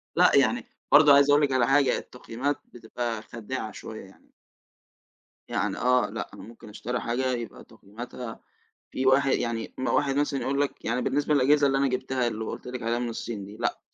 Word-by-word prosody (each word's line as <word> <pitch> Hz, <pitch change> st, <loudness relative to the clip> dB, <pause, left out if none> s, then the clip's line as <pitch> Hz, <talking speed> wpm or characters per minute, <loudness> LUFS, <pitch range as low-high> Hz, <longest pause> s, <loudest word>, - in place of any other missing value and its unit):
لأ، -, -, +5 dB
يعني -, -, +3 dB, 0.3 s
برضو 145 Hz, 0 st, +8 dB
عايز 140 Hz, 0 st, +6 dB
أقول 145 Hz, -, +5 dB
لِك 145 Hz, -2 st, +2 dB
على 130 Hz, -2 st, +2 dB
حاجة 135 Hz, 0 st, +3 dB
التقييمات 125 Hz, +3 st, -4 dB
بتبقى 115 Hz, -1 st, -5 dB
خدّاعة 115 Hz, 0 st, -6 dB
شويّة 110 Hz, -1 st, -9 dB
يعني. 95 Hz, -, -20 dB, 1.2 s
يعني -, -, -1 dB
آه، 125 Hz, +1 st, +2 dB
لأ، -, -, -5 dB
أنا -, -, -11 dB
ممكن 115 Hz, -1 st, -13 dB
أشتري 120 Hz, +3 st, -4 dB
حاجة 130 Hz, +2 st, -1 dB
يبقى 120 Hz, -2 st, -6 dB
تقييماتها 115 Hz, +3 st, -9 dB, 0.5 s
في 130 Hz, -, -2 dB
واحد 135 Hz, +1 st, +4 dB
يعني 115 Hz, -2 st, -2 dB
ما 130 Hz, -, -1 dB
واحد 140 Hz, -2 st, +1 dB
مثلًا 145 Hz, -1 st, 0 dB
يقول 140 Hz, +1 st, -1 dB
لك 145 Hz, -2 st, -2 dB
يعني 120 Hz, +3 st, 0 dB
بالنسبة 145 Hz, +2 st, +1 dB
للأجهزة 145 Hz, +1 st, +4 dB
اللي 135 Hz, 0 st, +2 dB
أنا 140 Hz, 0 st, +2 dB
جبتها 130 Hz, 0 st, -1 dB
اللي 110 Hz, -1 st, -4 dB
قلت -, -, -7 dB
لِك 125 Hz, 0 st, -6 dB
عليها 115 Hz, +1 st, 0 dB
من 120 Hz, -, -2 dB
الصين 115 Hz, -2 st, -5 dB
دي، 105 Hz, +2 st, -11 dB
لأ، 115 Hz, -, -2 dB
125 Hz, 190 wpm, -26 LUFS, 115-140 Hz, 1.2 s, برضو